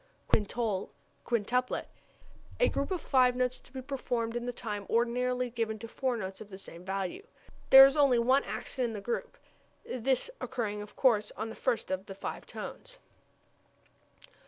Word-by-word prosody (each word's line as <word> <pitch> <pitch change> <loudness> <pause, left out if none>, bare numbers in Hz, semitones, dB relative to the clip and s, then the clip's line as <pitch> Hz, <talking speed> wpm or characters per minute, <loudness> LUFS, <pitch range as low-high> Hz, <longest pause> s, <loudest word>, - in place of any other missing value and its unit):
Quintole, 210 -2 0 0.4
quintuplet 245 +2 0 0.7
a - - +5
group 280 - -2
of 370 -2 -1
five 255 -4 +3
notes 250 0 0
to - - -19
be 260 0 -6
performed 245 -4 -2
in 240 0 -3
the - - 0
time 210 -4 -5
ordinarily 250 +1 +1
given 225 -2 -2
to 230 +2 -8
four 255 +1 -1
notes 190 -2 -5
of 210 - -9
the 190 - -8
same 175 -3 -11
value. 190 - -3 0.5
There 270 0 +12
is 275 - +3
only 280 -4 +5
one 255 +4 +4
accent 255 -2 -3
in 230 - -5
the 210 - -4
group, 235 +4 -3 0.5
this 255 - 0
occurring 210 -4 -2
of 210 - -10
course 215 -6 +3
on 220 +1 -3
the 225 - -8
first 245 -7 -1
of 190 +1 -2
the 195 - -7
five - - -6
tones. - - -8
235 Hz, 170 wpm, -31 LUFS, 210-255 Hz, 0.7 s, There